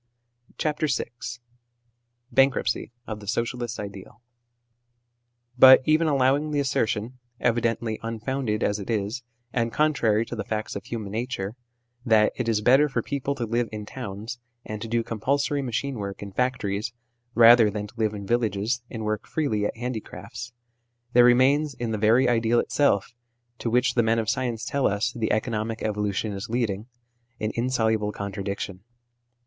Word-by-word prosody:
CHAPTEE 155 0 0
VI 135 -3 0 1.3
BANKKUPTCY 135 -4 +2 0.2
OE 110 - -3
THE 105 -1 -12
SOCIALIST 120 +2 -2
IDEAL 100 +2 -8 1.4
BUT 130 0 +10
even 155 +1 +3
allowing 140 +1 +2
the 150 -1 0
assertion 125 -2 -1 0.2
(evidently 115 -2 0
unfounded 115 0 -2
as 105 +1 +1
it 100 - -7
is, 110 +2 -1 0.3
and 115 -1 0
contrary 120 -8 +2
to 120 - -6
the 110 - -3
facts 110 -1 -3
of - - -6
human 110 -4 -5
nature), 110 -3 -3 0.5
that 110 -3 +4
it 125 -2 -2
is 110 -2 +1
better 135 +6 +5
for 120 -4 -1
people 140 0 -2
to 120 -4 -2
live 115 +1 0
in 105 -1 -6
towns 110 0 -6 0.3
and 105 -1 -6
to 115 - -4
do 115 +1 0
compulsory 140 +6 0
machine 130 +1 -2
work 100 0 -5
in 100 - -7
factories, 110 -2 -1 0.4
rather 115 -1 +8
than 105 0 -4
to 105 - -13
live 110 -1 +1
in 100 -1 -6
villages 115 +1 0
and 110 -2 -5
work 105 0 -2
freely 110 -10 0
at - - -7
handicrafts 120 0 -6 0.6
there 120 - +7
remains 135 +4 +4
in 120 -2 -3
the 110 - -2
very 115 +5 +4
ideal 115 0 +3
itself, 120 -8 +1 0.5
to 115 - -2
which 125 +1 +2
the 120 - +3
men 115 0 +2
of 110 -1 +1
science 120 -3 -2
tell 140 -1 +1
us 105 +4 0
the 115 -2 -1
economic 110 0 -1
evolution 105 0 -1
is 95 +2 -6
leading, 110 -3 -1 0.5
an 110 0 -1
insoluble 110 -4 +1
contradiction. 100 -1 -5
115 Hz, 155 wpm, -25 LUFS, 105-125 Hz, 1.4 s, BUT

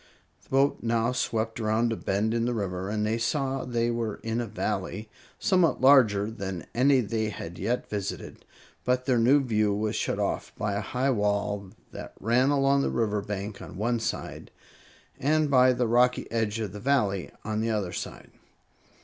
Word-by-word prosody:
The - - -26
boat 135 +1 +2
now 115 0 +1
swept 115 -2 -2
around 115 +1 +1
a - - -2
bend 105 +2 -1
in 115 0 0
the 120 0 -1
river, 95 -2 -3
and 105 0 -1
they 110 +2 0
saw 135 +2 -1
they 120 -1 0
were 115 -3 -2
in 115 +1 -1
a 120 - -4
Valley 105 0 -3 0.3
somewhat 185 -6 +2
larger 110 -6 +5
than 95 -5 -5
any 130 +2 +4
they 110 0 -1
had 85 -4 -7
yet 125 +2 -1
visited; 100 -2 -5 0.4
but 125 0 0
their 130 -3 +2
view 115 -5 +3
was 105 0 -1
shut - - -1
off - - -2
by 105 -1 -1
a 100 - -1
high 130 +6 0
wall 105 -3 -1 0.2
that - - -8
ran 120 +5 +2
along 140 -1 +3
the - - 0
river 105 -3 0
bank 100 0 -5
on - - -9
one 115 +3 0
side, - - -4 0.7
and 150 +1 +2
by 130 -1 +6
the 125 0 0
rocky 125 +2 +3
edge 115 -1 -1
of 105 -4 -3
the 105 - -8
Valley 105 -7 +1 0.2
on 110 0 -1
the 115 - 0
other 100 -5 -1
side. - - -7
115 Hz, 180 wpm, -27 LUFS, 105-125 Hz, 0.7 s, by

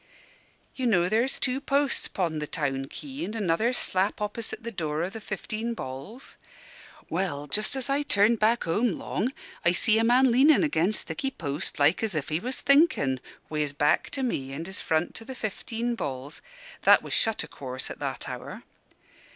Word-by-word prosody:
You 260 -2 -1
know 180 -6 +3
there's 230 +6 +2
two 260 +1 -1
posts 280 -2 +1
'pon 165 -5 -1
the 150 - -3
town 135 -4 -2
quay, 280 - -7
and 215 - -4
another 210 +2 +1
slap 195 -5 0
opposite 210 +2 -4
the 235 - -4
door 155 -5 -2
o' 180 - -3
the 225 - -8
'Fifteen 220 +3 -4
Balls'? 140 - -8 0.7
Well, 160 -5 -2
just 210 - +1
as 265 -1 -2
I 280 +1 +1
turned 220 -4 +3
back 225 +3 +3
home 210 +6 +1
long, 215 +8 -2 0.3
I 170 - +4
see 220 +4 +3
a - - +3
man 250 +2 +5
leanin' 280 +7 +6
against 210 - +1
thicky 270 - -2
post 150 - -4
like 145 +4 +4
as 220 -6 -2
if 150 -1 -2
he 155 +1 0
was 255 +7 -2
thinkin', 280 - +4 0.3
wi' 155 - -3
his 145 -1 0
back 145 +1 +2
to 270 - -1
me 135 - -2
and 160 +4 -5
his 190 +2 -4
front 160 +2 0
to - - -8
the 260 +3 -8
'Fifteen 230 +1 -3
Balls' 140 - -5 0.4
(that - - +6
was - - -5
shut, 225 -2 +1
o' - - -8
course, 130 -1 -5
at - - -8
that - - -4
hour). - - -7
210 Hz, 190 wpm, -27 LUFS, 155-245 Hz, 0.7 s, leanin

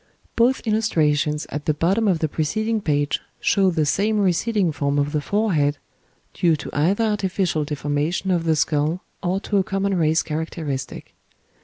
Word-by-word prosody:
Both 245 +3 +2
illustrations 155 -9 +1
at 145 0 -4
the 155 - +1
bottom 195 +8 +1
of 185 -4 +3
the 160 - 0
preceding 215 +9 -1
page 145 -4 0 0.2
show 195 -1 +3
the 160 -4 +1
same 210 +7 +1
receding 195 0 +1
form 140 -1 -1
of 145 0 +1
the 150 -1 -1
forehead, 155 -7 +1 0.6
due 170 -3 +2
to 145 - -7
either 185 +9 +2
artificial 190 -7 0
deformation 150 +5 -1
of 170 -2 0
the 160 -1 +3
skull 155 +3 0 0.2
or 185 +1 0
to 205 - -1
a 195 - +3
common 195 +1 -1
race 160 -1 +2
characteristic. 155 -4 -5
165 Hz, 160 wpm, -22 LUFS, 150-200 Hz, 0.6 s, of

